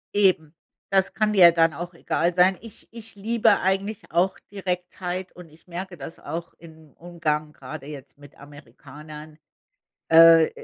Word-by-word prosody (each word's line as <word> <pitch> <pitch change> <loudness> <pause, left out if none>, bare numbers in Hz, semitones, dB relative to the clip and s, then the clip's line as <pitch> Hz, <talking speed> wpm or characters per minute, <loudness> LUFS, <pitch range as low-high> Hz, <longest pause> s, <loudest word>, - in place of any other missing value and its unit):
Eben. 185 -7 +2 0.4
Das 195 -1 +1
kann 215 -1 +1
dir 180 -4 +8
dann 165 -1 +2
auch 175 +4 -8
egal 170 +1 -1
sein. 185 +1 +4
Ich 230 -2 -14
ich 225 -2 -12
liebe 225 +3 +2
eigentlich 195 +2 -1
auch 175 +3 +1
Direktheit 180 -1 -5
und 175 -3 -13
ich 155 +2 -22
merke 180 +1 -7
das 145 +3 -9
auch 170 +1 -7
im 160 -3 -16
Umgang 155 -3 -3
grade 140 0 -10
jetzt 140 -1 -11
mit 145 0 -16
Amerikanern, 150 +2 -13 0.7
äh, 165 0 +7
170 Hz, 145 wpm, -24 LUFS, 155-190 Hz, 0.7 s, dir